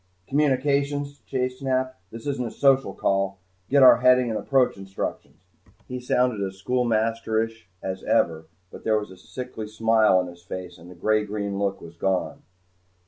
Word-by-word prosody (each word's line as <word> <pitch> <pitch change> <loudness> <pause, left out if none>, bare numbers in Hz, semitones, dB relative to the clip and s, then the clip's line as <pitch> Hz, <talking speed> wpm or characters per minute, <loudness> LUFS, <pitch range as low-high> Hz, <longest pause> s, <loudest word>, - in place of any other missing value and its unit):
"Communications," 140 0 +1
Chase 130 -1 -2
snapped. 130 -1 -1
"This 115 +2 -10
isn't 135 -4 -2
a - - -4
social 135 +2 +2
call. 100 0 0 0.3
Get 140 0 +5
our 130 - +9
heading 125 -1 +4
and 110 - -1
approach 135 -3 +2
instructions." 95 -2 -6 0.4
He 125 0 -5
sounded 125 -3 +1
as 95 -1 -3
schoolmasterish 115 -1 0 0.2
as 95 0 -4
ever, 80 -1 +1 0.3
but - - -11
there 110 -1 +2
was 105 -2 -4
a - - -11
sickly 120 +2 -7
smile 110 -2 +3
on 90 - +1
his 85 -1 -11
face, 90 0 -8
and 85 - -13
the 90 - -12
gray 110 +4 +1
green 100 -1 -3
look 100 -1 -1
was 85 0 -12
gone. 95 +1 -1
110 Hz, 165 wpm, -25 LUFS, 95-130 Hz, 0.4 s, our